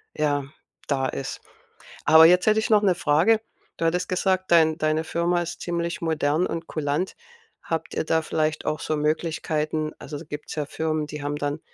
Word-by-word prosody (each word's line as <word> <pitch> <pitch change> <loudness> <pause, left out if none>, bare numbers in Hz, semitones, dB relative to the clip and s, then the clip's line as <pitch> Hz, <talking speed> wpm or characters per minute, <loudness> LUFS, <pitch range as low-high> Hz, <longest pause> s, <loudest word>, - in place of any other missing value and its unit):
ja, 145 -2 0 0.4
da 135 -2 0
ist. 135 - -5 0.7
Aber 160 +2 +8
jetzt 180 +4 +5
hätte 215 0 +5
ich 220 - -2
noch 210 -1 +5
'ne 185 -3 +3
Frage. 175 +10 +3 0.4
Du 165 - -1
hattest 180 +2 0
gesagt, 185 0 0
dein 160 -1 +5
deine 155 +1 +1
Firma 170 +2 0
ist 170 0 -6
ziemlich 170 0 -3
modern 160 +1 +1
und 165 0 -5
kulant. 155 +4 -2 0.5
Habt 165 0 -3
ihr - - -1
da 160 0 +2
vielleicht 155 0 -1
auch 155 0 -1
so 155 - -1
Möglichkeiten 155 0 -1
also, 145 0 -7
gibt's 150 +1 -7
ja 150 -2 -2
Firmen, 155 0 -2
die 150 -1 -7
haben 145 0 -2
dann 145 +1 -2
160 Hz, 180 wpm, -24 LUFS, 150-170 Hz, 0.7 s, Aber